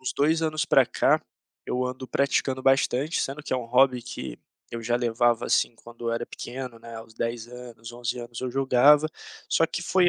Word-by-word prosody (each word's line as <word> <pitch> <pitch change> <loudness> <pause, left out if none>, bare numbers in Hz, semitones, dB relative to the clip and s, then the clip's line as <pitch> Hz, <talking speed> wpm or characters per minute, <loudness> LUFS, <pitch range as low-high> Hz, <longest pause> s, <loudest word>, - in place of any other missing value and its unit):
uns 130 - -3
2 160 +3 +2
anos 155 -1 0
pra - - +4
cá, - - +2 0.5
eu 125 0 -1
ando 130 +1 -5
praticando 130 +1 0
bastante, 135 +3 +2
sendo 140 +2 -3
que - - -5
é - - +2
um 125 - -4
hobby 125 +1 +3
que 120 - -7 0.3
eu 115 - -5
já 120 +1 0
levava, 120 -1 +1
assim, 120 - +2
quando 120 0 -8
eu - - 0
era 115 +1 -2
pequeno, 125 -1 -7
né, 115 0 -11
aos 115 0 -11
10 115 0 -3
anos, 120 -1 -10
11 120 0 -3
anos 120 0 -7
eu 130 - -3
jogava, 135 +4 +5 0.4
só 165 - +3
que 175 - -4
foi 180 0 +3
125 Hz, 200 wpm, -26 LUFS, 120-135 Hz, 0.5 s, jogava